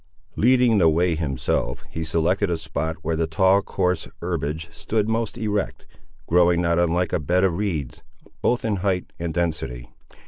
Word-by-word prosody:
Leading 125 Hz, -2 st, +4 dB
the 85 Hz, -3 st, +5 dB
way 85 Hz, +2 st, +2 dB
himself, 70 Hz, -3 st, -2 dB
he 80 Hz, +1 st, -5 dB
selected 85 Hz, +5 st, +1 dB
a 85 Hz, -, 0 dB
spot 80 Hz, 0 st, -3 dB
where 80 Hz, +1 st, 0 dB
the 80 Hz, 0 st, 0 dB
tall 95 Hz, +5 st, +3 dB
coarse 90 Hz, -2 st, -1 dB
herbage 80 Hz, +3 st, -3 dB
stood 105 Hz, +6 st, -1 dB
most 110 Hz, -1 st, -1 dB
erect, 105 Hz, -3 st, -2 dB, 0.4 s
growing 85 Hz, 0 st, +4 dB
not 85 Hz, -1 st, +2 dB
unlike 85 Hz, +1 st, +1 dB
a -, -, +2 dB
bed 90 Hz, +5 st, +1 dB
of 95 Hz, -3 st, +3 dB
reeds, 80 Hz, -9 st, -3 dB, 0.4 s
both 120 Hz, -1 st, +1 dB
in 105 Hz, -3 st, 0 dB
height 95 Hz, -1 st, -1 dB
and 85 Hz, -1 st, -2 dB
density. 80 Hz, -8 st, -2 dB
85 Hz, 165 wpm, -23 LUFS, 80-100 Hz, 0.4 s, the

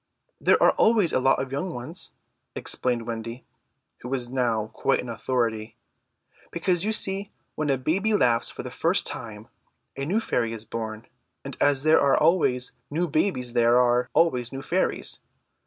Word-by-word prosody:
"There -, -, +4 dB
are -, -, +7 dB
always 215 Hz, -7 st, +3 dB
a -, -, +3 dB
lot 135 Hz, +1 st, +3 dB
of 135 Hz, -1 st, -4 dB
young 160 Hz, +7 st, -3 dB
ones," 155 Hz, +9 st, -4 dB, 0.4 s
explained 120 Hz, -2 st, -1 dB
Wendy, 115 Hz, +1 st, -6 dB, 0.5 s
who 125 Hz, -, -8 dB
was 125 Hz, -2 st, -1 dB
now 115 Hz, -4 st, 0 dB
quite -, -, +1 dB
an 125 Hz, -, -5 dB
authority, 115 Hz, -2 st, -2 dB, 0.7 s
"because 175 Hz, +1 st, 0 dB
you 215 Hz, -, 0 dB
see 195 Hz, -2 st, 0 dB, 0.2 s
when 155 Hz, -1 st, -2 dB
a 135 Hz, -, +2 dB
new 130 Hz, -, -15 dB
baby 195 Hz, -, +1 dB
laughs 120 Hz, -, +2 dB
for -, -, -7 dB
the -, -, -7 dB
first -, -, +1 dB
time 110 Hz, -1 st, -6 dB, 0.5 s
a 135 Hz, -, -4 dB
new 195 Hz, +9 st, +1 dB
fairy 115 Hz, -, -1 dB
is 115 Hz, -1 st, -6 dB
born, 110 Hz, 0 st, -6 dB, 0.4 s
and -, -, -6 dB
as 145 Hz, -1 st, +3 dB
there 155 Hz, +1 st, +5 dB
are 140 Hz, -, +4 dB
always 150 Hz, -6 st, +2 dB, 0.2 s
new 170 Hz, +4 st, -1 dB
babies 150 Hz, -6 st, -1 dB
there 120 Hz, 0 st, +4 dB
are 125 Hz, 0 st, +2 dB
always 125 Hz, -8 st, +2 dB
new 135 Hz, 0 st, -6 dB
fairies. 185 Hz, +2 st, 0 dB
130 Hz, 170 wpm, -25 LUFS, 120-165 Hz, 0.7 s, are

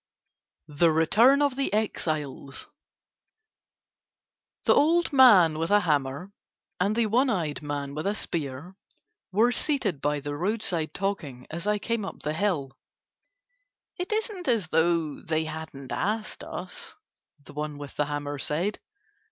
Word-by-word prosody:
THE 160 Hz, +2 st, +3 dB
RETURN 230 Hz, -, +5 dB
OF 285 Hz, -3 st, +1 dB
THE 275 Hz, 0 st, -1 dB
EXILES 155 Hz, -10 st, -2 dB, 2.0 s
The -, -, +5 dB
old 335 Hz, +2 st, +3 dB
man 190 Hz, -, +7 dB
with 165 Hz, +2 st, -1 dB
a 205 Hz, 0 st, +5 dB
hammer 145 Hz, +2 st, -1 dB, 0.5 s
and 200 Hz, +4 st, +1 dB
the 235 Hz, -1 st, +2 dB
one 250 Hz, +6 st, +2 dB
eyed 165 Hz, -9 st, -1 dB
man 145 Hz, -1 st, -4 dB
with 155 Hz, +6 st, -3 dB
a 205 Hz, -, 0 dB
spear 160 Hz, -1 st, -4 dB, 0.6 s
were 225 Hz, +6 st, +4 dB
seated 245 Hz, -, 0 dB
by 145 Hz, 0 st, 0 dB
the 145 Hz, +1 st, -5 dB
roadside 180 Hz, -2 st, -1 dB
talking 160 Hz, -11 st, -3 dB
as 170 Hz, +4 st, -5 dB
I 210 Hz, 0 st, +2 dB
came 230 Hz, +1 st, -2 dB
up 195 Hz, -, -7 dB
the 150 Hz, -, -1 dB
hill. 160 Hz, -7 st, 0 dB, 1.2 s
"It 360 Hz, +3 st, -4 dB
isn't 425 Hz, -4 st, -2 dB
as 225 Hz, -10 st, +1 dB
though 160 Hz, -2 st, +1 dB
they 160 Hz, 0 st, -1 dB
hadn't 155 Hz, -4 st, -7 dB
asked 215 Hz, +2 st, -2 dB
us," -, -, -7 dB, 0.4 s
the 145 Hz, -, -15 dB
one 150 Hz, 0 st, -4 dB
with 145 Hz, -1 st, -9 dB
the 150 Hz, -, +1 dB
hammer 145 Hz, -1 st, -4 dB
said. 170 Hz, +10 st, -1 dB
170 Hz, 140 wpm, -27 LUFS, 150-215 Hz, 2.0 s, man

